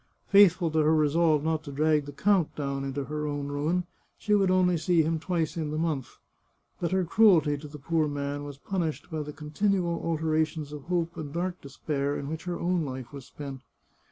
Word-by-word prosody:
Faithful 195 -4 +6
to 160 - +1
her 155 +1 +4
resolve 155 0 +3
not 160 0 0
to 145 - -7
drag 150 +1 +2
the - - -6
count 190 +2 +1
down 140 -2 -3
into 135 +1 -3
her 150 +2 -3
own 145 -1 -3
ruin, 155 +5 0 0.3
she 210 - 0
would 195 -2 +4
only 185 -1 +3
see 170 0 +2
him 160 +1 0
twice 165 -1 -1
in 160 -3 -2
the 155 - -3
month. 155 -6 -2 0.6
But 170 - -1
her 190 -1 +1
cruelty 170 -7 +5
to 150 - -9
the 150 +1 -10
poor 155 +2 0
man 145 0 -3
was 145 -1 -8
punished 170 0 -3
by 155 -1 -2
the 150 0 -6
continual 170 +4 -1
alternations 155 -2 -1
of 145 -2 -8
hope 170 -1 -1
and 145 -3 -5
dark 175 +3 -3
despair 140 0 -2
in 140 - -5
which 160 +2 -5
her 175 -1 -3
own 175 -1 +1
life 130 -2 -6
was 135 -3 -9
spent. 140 -2 -8
155 Hz, 205 wpm, -28 LUFS, 145-170 Hz, 0.6 s, Faithful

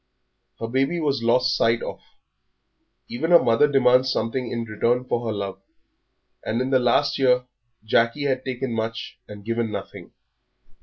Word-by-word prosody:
Her 115 - -3
baby 135 +8 0
was 140 -5 -1
lost 125 +2 +2
sight 115 0 +1
of. - - -6 1.1
Even 160 +8 -3
a 175 - +10
mother 130 +2 +3
demands 130 -1 +4
something 115 +2 -2
in 115 -1 -2
return 115 +3 0
for 120 -1 -2
her - - -1
love, 100 -2 -5 0.8
and 115 - -2
in 130 +1 -2
the 130 - +4
last 125 +4 +1
year 125 -1 +3 0.4
Jackie 115 +6 +1
had 130 -2 -1
taken 130 -1 -4
much 115 +1 -4
and 105 -1 -11
given 115 -1 -2
nothing. 100 -2 -8
120 Hz, 155 wpm, -23 LUFS, 115-130 Hz, 1.1 s, a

